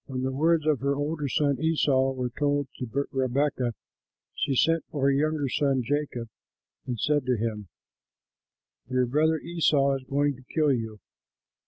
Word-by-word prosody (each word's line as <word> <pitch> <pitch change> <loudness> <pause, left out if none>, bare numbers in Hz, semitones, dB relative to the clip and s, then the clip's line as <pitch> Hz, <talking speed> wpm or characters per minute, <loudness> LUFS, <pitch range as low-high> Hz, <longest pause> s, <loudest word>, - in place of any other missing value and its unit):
When 130 -1 -4
the 130 - 0
words 155 +3 +2
of 155 -4 +2
her 140 +2 0
older 145 +1 -2
son 140 -1 +1
Esau 140 -5 +2
were 125 -2 -3
told 145 +1 0
to 130 +3 -2
Rebekah, 130 -2 0 0.6
she 135 - -1
sent 165 +4 +3
for 145 - -4
her 140 - +5
younger 150 +1 +1
son 135 -1 +1
Jacob 135 -2 -2 0.6
and 120 -3 -3
said 150 +2 +1
to 125 -2 +2
him, 105 -2 -3 1.2
"Your 130 0 +2
brother, 155 +5 +2
Esau, 150 -4 +2
is 135 - -12
going 145 0 +1
to 130 -1 -17
kill 155 -3 +3
you. 110 -4 -4
140 Hz, 160 wpm, -27 LUFS, 130-150 Hz, 1.2 s, her